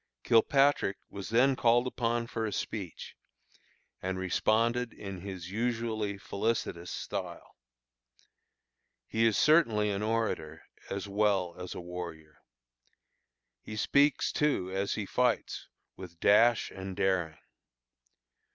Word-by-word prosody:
Kilpatrick 135 -2 +3
was 100 0 -6
then 130 +4 +4
called 120 0 +3
upon 120 -2 -1
for 115 -1 -3
a - - -3
speech, 100 -5 -5 0.9
and 95 0 -2
responded 115 +6 +1
in 95 -3 -7
his 95 -2 -7
usually 110 -2 -1
felicitous 100 -4 -2
style. - - -6 1.5
He 115 +1 +2
is 110 - +2
certainly 115 -10 +4
an 100 0 -2
orator 105 -8 -2 0.3
as 100 +1 -4
well 100 -3 +1
as 90 0 -6
a - - -5
warrior. 85 -3 -8 1.2
He 110 - -8
speaks, 140 +7 +3
too, 140 -12 0
as 95 +1 -1
he 105 - -3
fights, 125 +3 0 0.3
with 85 -3 -11
dash 115 +4 +4
and 95 -1 -7
daring. 95 -5 0
105 Hz, 115 wpm, -30 LUFS, 95-115 Hz, 1.5 s, then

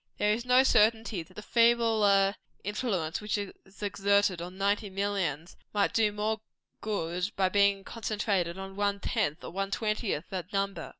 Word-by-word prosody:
There 210 0 +2
is 235 +3 -3
no 250 +1 +5
certainty 220 -4 +3
that 185 +3 -15
the 210 - -8
feebler 220 -5 +4 0.3
influence 195 -6 -2
which 210 0 -1
is 200 -2 -5 0.3
exerted 200 -2 +2
on 180 +2 -7
ninety 200 +1 0
millions, 190 -5 -2 0.2
might 205 - +2
not - - -26
do 215 -2 +3
more 215 +1 -2 0.4
good 180 -3 -2
by 190 -1 +2
being 200 0 +3
concentrated 200 -6 -2
on 195 0 -7
one 200 0 0
tenth 200 -9 -1
or - - -7
one 195 +2 -2
twentieth 210 -5 -1
that 185 0 -5
number. 195 -1 -2
200 Hz, 165 wpm, -29 LUFS, 190-215 Hz, 0.4 s, no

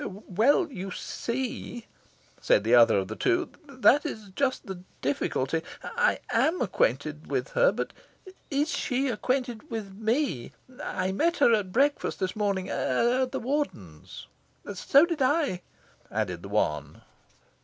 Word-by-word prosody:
"Well, 215 - +1
you 195 -5 -5
see," 240 +3 -4 0.6
said - - +3
the 115 +2 +1
other 115 -3 +7
of 95 -1 -1
the - - -6
two, 360 -2 +1 0.2
"that 265 +1 +4
is 220 -10 -6
just 270 -2 0
the 190 -3 -7 0.2
difficulty. 140 +2 -1 0.2
I 475 +1 +1 0.2
AM 330 +4 +2
acquainted - - 0
with - - -2
her. - - +4
But - - -4 0.6
is 290 +2 +1
she 260 +2 0
acquainted 245 0 -2
with 215 -4 -5
ME? 220 - -1 0.3
I 185 -7 -2
met 330 - +1
her 240 -5 +5
at 205 -4 0
breakfast 280 +7 +1
this 185 -2 -2
morning, 200 -3 -1
at 245 - +1
the - - -2
Warden's." 225 - -4 0.5
"So 275 - +5
did 335 -4 -3
I," 270 - +2 0.5
added 95 -5 -2
the 100 - -9
one. 100 -7 -1
230 Hz, 140 wpm, -27 LUFS, 185-280 Hz, 0.6 s, other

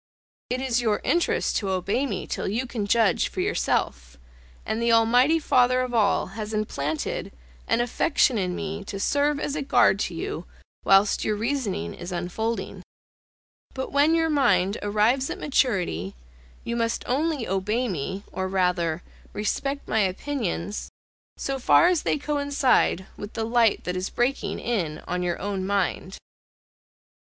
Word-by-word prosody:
It 255 +1 -1
is 245 -2 +1
your 220 -3 +1
interest 345 0 +1
to 200 - -2
obey 195 +9 0
me 195 -7 -4
till - - -3
you 225 +6 -1
can 230 -5 -4
judge 220 -3 +3
for - - -7
yourself; - - -1 0.5
and 220 +1 -2
the 235 0 +2
Almighty 245 +7 +5
Father 255 -4 +3
of 250 -1 -3
all 215 -4 +2
has 215 0 -4
implanted 155 -8 -3 0.4
an 240 - +2
affection 245 0 +2
in 180 -2 -1
me 200 0 -4
to 195 - -6
serve 285 +6 +1
as 290 -1 -2
a 305 - -2
guard 235 -7 +4
to 175 - -2
you 165 +1 -5 0.4
whilst 195 +1 +4
your 215 - 0
reason 215 - -2
is 175 +1 -8
unfolding; 180 +6 -3 0.9
but 260 0 -4
when 290 +4 +4
your 325 -1 +2
mind 200 -9 +2
arrives 215 +6 +2
at - - -4
maturity, 185 - 0 0.5
you 235 - -3
must 230 -1 -1
only 290 -1 0
obey 210 +6 0
me, 190 +1 -4
or 190 0 -2
rather 180 -3 0 0.3
respect 275 +7 -2
my 220 - +1
opinions, 205 -1 -2 0.5
so 270 -1 -3
far 340 +7 +5
as 360 -4 +2
they - - 0
coincide 285 - +1
with 205 +1 -8
the 225 - -2
light 230 -2 +2
that 180 - -3
is 185 +1 -2
breaking 250 +3 -1
in 175 -10 -2
on 180 0 -2
your 175 -1 -1
own 195 -1 -3
mind. 195 -1 -1
220 Hz, 155 wpm, -25 LUFS, 190-260 Hz, 0.9 s, Almighty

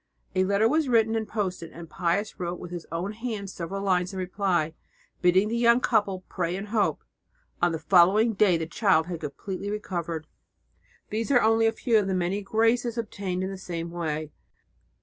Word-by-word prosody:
A 185 0 +2
letter 200 +3 +3
was 305 +2 +1
written 225 -2 +3
and 220 -1 -1
posted, 185 -6 -3
and 170 0 -10
Pius 180 +5 -1
wrote 175 0 -3
with 175 - -8
his 175 -2 -6
own 175 +4 -2
hand 215 -3 -5
several 190 +3 -5
lines 185 -1 +1
in - - -5
reply, 180 -4 0 0.5
bidding 185 +3 +4
the 225 - -2
young 235 0 +5
couple 205 -6 +1
pray 175 -1 -2
and 200 +2 -6
hope. 205 -8 +1 0.6
On 175 0 +3
the 165 - -2
following 190 +7 +4
day 195 -4 +4
the 165 - -3
child 170 -1 +2
had 175 -1 -5
completely 185 +7 -5
recovered. 170 -6 -4 0.9
These 225 +3 -2
are 250 -4 +4
only 225 +1 +4
a - - +3
few 225 0 +2
of 200 - -1
the 190 - 0
many 185 +3 0
graces 225 +3 +1
obtained 195 -5 -3
in 190 - -3
the 195 - -7
same 170 -2 -5
way. 155 -3 -3
190 Hz, 190 wpm, -26 LUFS, 175-220 Hz, 0.9 s, young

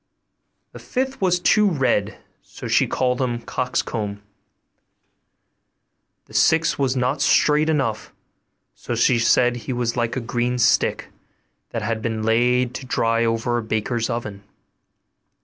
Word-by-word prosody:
The - - -11
fifth 265 -1 -3
was 180 -2 +2
too 210 +3 +3
red, 130 - 0 0.2
so - - -10
she - - +2
called 125 0 0
him 120 -2 -1
'Coxcomb.' 105 -5 -3 2.0
The - - -19
sixth 160 -1 +2
was 135 -1 +1
not 130 +3 0
straight 150 +2 +3
enough; 130 -8 -1 0.6
so - - -5
she 120 -2 +3
said 120 +1 +3
he 120 +2 -5
was 120 -1 -2
like 120 -2 -1
a - - -1
green 120 +1 -2
stick, 120 - +1 0.6
that 115 - -4
had 110 +1 -2
been 110 -1 -3
laid 120 +2 +2
to 130 - -7
dry 115 -2 +1
over 115 +1 0
a - - -3
baker's 110 +2 -2
oven. 105 -4 -4
120 Hz, 135 wpm, -22 LUFS, 115-130 Hz, 2.0 s, too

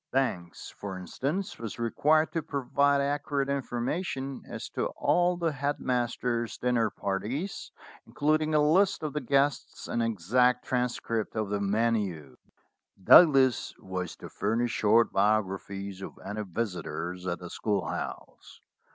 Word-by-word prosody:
Banks, 95 -11 -2
for 100 -2 -6
instance, 150 - -3
was 115 -2 -6
required 150 +7 +2
to 165 - -1
provide 140 -1 +1
accurate 140 0 -1
information 135 +1 -2
as - - -6
to - - -1
all 175 0 +2
the 170 -2 0
head 140 +1 -2
master's 120 -1 -1
dinner 120 -3 +1
parties, 110 - -4 0.4
including 155 +1 +1
a - - +5
list 190 0 +3
of 150 - -3
the 150 - -2
guests 140 +2 0
and 120 - -1
an 115 0 +1
exact 125 +6 +2
transcript 120 -3 -1
of 110 -2 -1
the 100 0 -1
menu. 100 - 0 0.7
Douglas 135 - +6
was 90 -2 -5
to - - -10
furnish 115 +4 0
short 115 +2 +3
biographies 100 -1 -1
of - - -8
any 105 +1 -4
visitors 90 -3 -4
at 85 -1 -1
the 90 -1 -9
schoolhouse. 105 -3 -4
120 Hz, 135 wpm, -28 LUFS, 100-140 Hz, 0.7 s, Douglas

